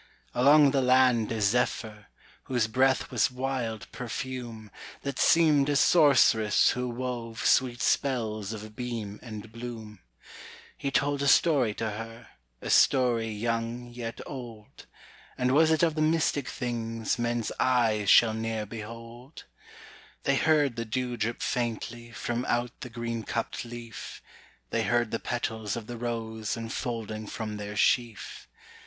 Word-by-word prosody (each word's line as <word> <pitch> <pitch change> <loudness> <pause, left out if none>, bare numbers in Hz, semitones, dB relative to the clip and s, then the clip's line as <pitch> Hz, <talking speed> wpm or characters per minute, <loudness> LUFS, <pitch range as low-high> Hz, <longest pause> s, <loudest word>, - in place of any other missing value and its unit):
Along 140 +3 +6
the 135 -1 +2
land 125 -3 +4
a 115 - -2
zephyr, 105 0 0 0.4
Whose 120 -3 +1
breath 130 +5 +1
was 120 -5 +2
wild 125 -4 -3
perfume, 120 -3 -6 0.3
That 140 0 -4
seemed 150 -4 +4
a 145 - +1
sorceress 135 - +5
who 125 0 -2
wove 120 -3 -5
Sweet 125 -2 +3
spells 110 -7 0
of 110 -1 -8
beam 115 -4 -5
and 110 -2 -9
bloom. 115 -3 -8 0.8
He 140 - -3
told 140 +1 0
a 140 - +1
story 135 -8 +4
to 110 -1 -2
her, 115 +2 -8 0.3
A - - -2
story 120 -4 +4
young 115 +2 -3
yet 120 -1 -6
old 120 -6 -10 0.5
And 125 0 +1
was 155 +4 +5
it 160 +1 +2
of 165 -2 +3
the 155 - -2
mystic 155 -3 +1
things 115 -2 -3
Men's 120 -1 -1
eyes 115 -5 +2
shall 115 -2 +6
ne'er 110 -1 -3
behold? 115 +5 -10 0.8
They 140 - +2
heard 145 -5 +2
the 115 - -1
dew 125 +2 -2
drip 115 0 -2
faintly 120 -1 -3
From 120 +1 -3
out 120 0 0
the 125 - -7
green 115 0 -4
cupped 115 +1 -3
leaf; 120 -1 -9 0.5
They - - +1
heard 120 -2 +1
the 115 - -1
petals 110 -4 -3
of 115 -2 -6
the 120 - -7
rose 115 -2 -3
Unfolding 115 -2 -4
from 110 -1 -5
their 105 0 -6
sheaf. 115 0 0
120 Hz, 140 wpm, -28 LUFS, 110-130 Hz, 0.8 s, Along